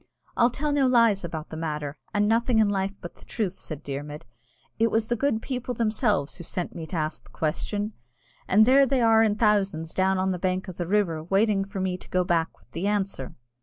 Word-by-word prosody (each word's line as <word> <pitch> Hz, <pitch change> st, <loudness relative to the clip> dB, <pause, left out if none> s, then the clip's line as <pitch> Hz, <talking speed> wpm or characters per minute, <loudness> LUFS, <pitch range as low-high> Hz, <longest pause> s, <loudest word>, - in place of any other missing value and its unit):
"I'll 235 Hz, -, +4 dB
tell 295 Hz, +4 st, -2 dB
no 280 Hz, -2 st, +3 dB
lies 230 Hz, -6 st, +4 dB
about 160 Hz, -2 st, -5 dB
the 160 Hz, -, -7 dB
matter, 150 Hz, -3 st, -3 dB, 0.2 s
and 210 Hz, 0 st, +2 dB
nothing 230 Hz, +2 st, +2 dB
in 215 Hz, -2 st, +4 dB
life 195 Hz, 0 st, -1 dB
but 175 Hz, -, -8 dB
the -, -, -16 dB
truth," 210 Hz, -6 st, -2 dB
said 155 Hz, -6 st, -7 dB
Dermod. 145 Hz, +2 st, -6 dB, 0.6 s
"It 230 Hz, +1 st, +4 dB
was 225 Hz, 0 st, 0 dB
the 240 Hz, -, +2 dB
good 230 Hz, -3 st, 0 dB
people 250 Hz, -2 st, -3 dB
themselves 215 Hz, -, 0 dB
who 175 Hz, -, -7 dB
sent 175 Hz, +1 st, -4 dB
me 160 Hz, -2 st, -7 dB
to 180 Hz, -, -6 dB
ask 155 Hz, -1 st, -3 dB
the -, -, -18 dB
question, 205 Hz, +7 st, -2 dB, 0.5 s
and 215 Hz, +3 st, +6 dB
there 270 Hz, +3 st, +6 dB
they 260 Hz, -1 st, +1 dB
are 225 Hz, -1 st, +5 dB
in 215 Hz, -2 st, +3 dB
thousands 200 Hz, -7 st, +1 dB
down 190 Hz, 0 st, +2 dB
on 190 Hz, 0 st, +1 dB
the 180 Hz, -, -3 dB
bank 185 Hz, +2 st, -1 dB
of 185 Hz, -, -8 dB
the 175 Hz, -, -3 dB
river, 180 Hz, -6 st, +1 dB
waiting 195 Hz, +3 st, +2 dB
for 195 Hz, 0 st, -6 dB
me 185 Hz, -1 st, -1 dB
to -, -, -13 dB
go 185 Hz, 0 st, +2 dB
back 170 Hz, -2 st, 0 dB
with -, -, -27 dB
the 175 Hz, +4 st, -2 dB
answer." 195 Hz, -10 st, -2 dB
195 Hz, 225 wpm, -26 LUFS, 170-225 Hz, 0.6 s, and